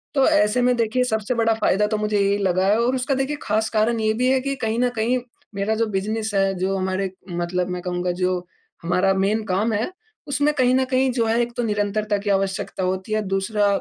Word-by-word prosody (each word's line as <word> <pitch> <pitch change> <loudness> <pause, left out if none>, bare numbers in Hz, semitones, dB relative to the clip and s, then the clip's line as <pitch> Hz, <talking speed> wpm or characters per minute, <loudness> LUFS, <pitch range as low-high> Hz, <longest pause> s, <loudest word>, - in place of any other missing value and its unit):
तो 270 -2 +4
ऐसे 250 -6 +3
में 250 0 +3
देखिए, 235 +2 +1
सबसे 220 -1 -1
बड़ा 225 -1 +2
फायदा 210 -1 +1
तो 215 0 -1
मुझे 210 -1 0
यही 200 0 +2
लगा 185 -1 +1
है 210 +3 +3
और 250 +2 +1
उसका 260 +2 0
देखिए 270 +3 -1
खास 220 +1 0
कारण 225 +1 +1
ये 215 0 +1
भी 250 +3 0
है 265 - +3
कि 275 +1 -2
कहीं 225 +1 0
न 250 0 +3
कहीं 235 +4 +1 0.4
मेरा 200 +2 0
जो 230 +1 +1
बिज़नेस 215 +2 -2
है, 195 0 +2
जो 190 +2 -1
हमारे 190 0 -1 0.2
मतलब 175 +1 -2
मैं 180 0 -4
कहूँगा 180 0 -2
जो 180 0 0 0.4
हमारा 180 +3 +2
मेन 200 +3 +1
काम 210 +4 0
है, 220 - -1 0.4
उसमें 290 +1 +1
कहीं 255 -2 +3
न 260 0 +2
कहीं 260 0 +1
जो 235 -2 0
है 225 +1 +2
एक 240 0 -2
तो 240 - 0
निरंतरता 210 0 0
की 205 +1 -4
आवश्यकता 195 -1 -1
होती 185 +3 -2
है, 215 - +1
दूसरा 200 +1 0
215 Hz, 225 wpm, -22 LUFS, 195-235 Hz, 0.4 s, तो